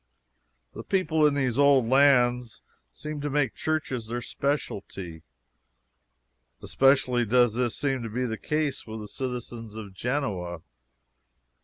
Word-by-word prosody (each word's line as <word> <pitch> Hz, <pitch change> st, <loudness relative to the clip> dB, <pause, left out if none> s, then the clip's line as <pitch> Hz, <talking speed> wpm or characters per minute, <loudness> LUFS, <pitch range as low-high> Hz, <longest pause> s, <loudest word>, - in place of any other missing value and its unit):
The -, -, -7 dB
people 160 Hz, -5 st, +2 dB
in 145 Hz, -, +1 dB
these 130 Hz, -2 st, 0 dB
old 140 Hz, -4 st, +5 dB
lands 125 Hz, -3 st, +3 dB, 0.3 s
seem 150 Hz, -1 st, -6 dB
to 145 Hz, -, -2 dB
make 140 Hz, -4 st, +1 dB
churches 150 Hz, -7 st, -2 dB
their 120 Hz, +2 st, -3 dB
specialty. 100 Hz, -, -4 dB, 1.4 s
Especially 130 Hz, -2 st, +3 dB
does 120 Hz, 0 st, +3 dB
this 120 Hz, -1 st, -1 dB
seem 135 Hz, -3 st, -1 dB
to 115 Hz, -, -5 dB
be 125 Hz, +4 st, -2 dB
the 110 Hz, -2 st, -2 dB
case 150 Hz, +1 st, -2 dB
with 110 Hz, 0 st, -6 dB
the 105 Hz, -, -7 dB
citizens 120 Hz, -3 st, -6 dB
of 105 Hz, -3 st, -8 dB
Genoa. 95 Hz, -, -3 dB
125 Hz, 130 wpm, -27 LUFS, 110-140 Hz, 1.4 s, old